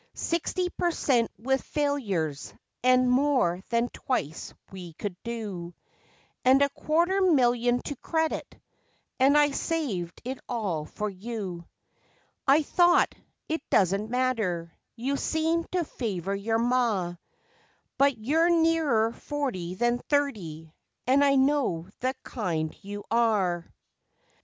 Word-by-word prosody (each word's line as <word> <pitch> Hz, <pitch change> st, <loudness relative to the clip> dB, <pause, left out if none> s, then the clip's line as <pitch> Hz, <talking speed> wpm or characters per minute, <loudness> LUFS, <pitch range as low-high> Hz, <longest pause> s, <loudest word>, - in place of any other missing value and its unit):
Sixty 350 Hz, +2 st, -1 dB
per 350 Hz, -, 0 dB
cent 250 Hz, -8 st, +1 dB
with 265 Hz, +4 st, 0 dB
failures, 205 Hz, -, -2 dB, 0.3 s
and 255 Hz, 0 st, +5 dB
more 250 Hz, -9 st, +2 dB
than 235 Hz, 0 st, +2 dB
twice 160 Hz, -, -3 dB, 0.2 s
we 180 Hz, -3 st, -9 dB
could 195 Hz, +3 st, -5 dB
do, 200 Hz, -7 st, -5 dB, 0.7 s
And 265 Hz, +2 st, +6 dB
a 280 Hz, -, +2 dB
quarter 340 Hz, +7 st, +1 dB
million 245 Hz, -8 st, +3 dB
to 285 Hz, -, -4 dB
credit, 320 Hz, +2 st, -2 dB, 0.6 s
and 275 Hz, +3 st, +5 dB
I 295 Hz, -1 st, +5 dB
saved 255 Hz, -, -2 dB
it 260 Hz, +1 st, -4 dB
all 200 Hz, -11 st, -2 dB
for 210 Hz, +6 st, -4 dB
you. 195 Hz, -4 st, -6 dB, 0.8 s
I 285 Hz, +3 st, +5 dB
thought 350 Hz, +4 st, +4 dB, 0.3 s
it 320 Hz, -1 st, -2 dB
doesn't 195 Hz, +3 st, +2 dB
matter 220 Hz, -10 st, -1 dB, 0.2 s
you 265 Hz, +4 st, -1 dB
seemed 325 Hz, +3 st, 0 dB
to 360 Hz, -1 st, +1 dB
favour 195 Hz, -, -3 dB
your 215 Hz, +3 st, 0 dB
ma, 230 Hz, -7 st, +1 dB, 0.9 s
But 280 Hz, -1 st, +4 dB
you're 310 Hz, +10 st, +2 dB
nearer 320 Hz, -9 st, +3 dB
forty 235 Hz, -12 st, -4 dB
than 240 Hz, +4 st, +1 dB
thirty, 185 Hz, -, -2 dB, 0.3 s
and 270 Hz, +3 st, +4 dB
I 280 Hz, -1 st, +4 dB
know 265 Hz, -, +2 dB
the 260 Hz, +2 st, -1 dB
kind 165 Hz, -, -3 dB
you 205 Hz, +1 st, -7 dB
are. 205 Hz, -7 st, +1 dB
240 Hz, 120 wpm, -27 LUFS, 195-285 Hz, 0.9 s, And